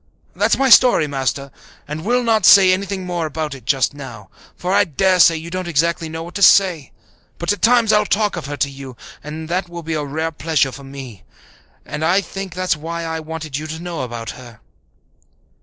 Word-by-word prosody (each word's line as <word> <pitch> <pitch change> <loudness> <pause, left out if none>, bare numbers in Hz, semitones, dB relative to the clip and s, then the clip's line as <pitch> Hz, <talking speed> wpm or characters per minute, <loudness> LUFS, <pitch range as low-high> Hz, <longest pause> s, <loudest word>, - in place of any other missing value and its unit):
"That's - - +2
my 270 -1 +2
story, 245 -12 +6
Master, 140 -1 -3 0.4
and 150 +2 -6
we'll 245 +4 +1
not 225 -3 +2
say 190 -1 +7
anything 190 0 -3
more 175 -3 -2
about 155 -1 -4
it 130 -4 -12
just 135 0 +1
now, 120 -9 -10 0.2
for 180 +1 -3
I - - +5
dare 185 +5 +1
say 165 -1 +6
you 165 +2 -8
don't 185 0 -4
exactly 165 0 0
know 160 +1 -6
what 175 +1 -10
to 200 - -5
say. 180 -8 +4 0.5
But 170 +4 0
at 205 - -9
times 235 -2 +4
I'll 210 -1 +3
talk 210 -1 +1
of 165 -5 -6
her 145 0 -5
to 140 - 0
you 135 -3 -10 0.3
and 155 +2 -7
that 180 +1 -2
will 170 -1 -8
be 160 +1 -4
a 150 -1 -2
rare 160 +3 -3
pleasure 150 -2 0
to 140 - -11
me; 135 -7 -10 0.6
I 165 +5 0
think 195 -1 -7
that 185 0 -4
was - - -13
why 165 +2 -5
I 160 0 -4
wanted 155 -2 -6
you 155 +1 -6
to 160 +1 -6
know 170 -2 -5
about 120 -2 -5
her." 120 -3 -13
160 Hz, 210 wpm, -19 LUFS, 140-185 Hz, 0.6 s, say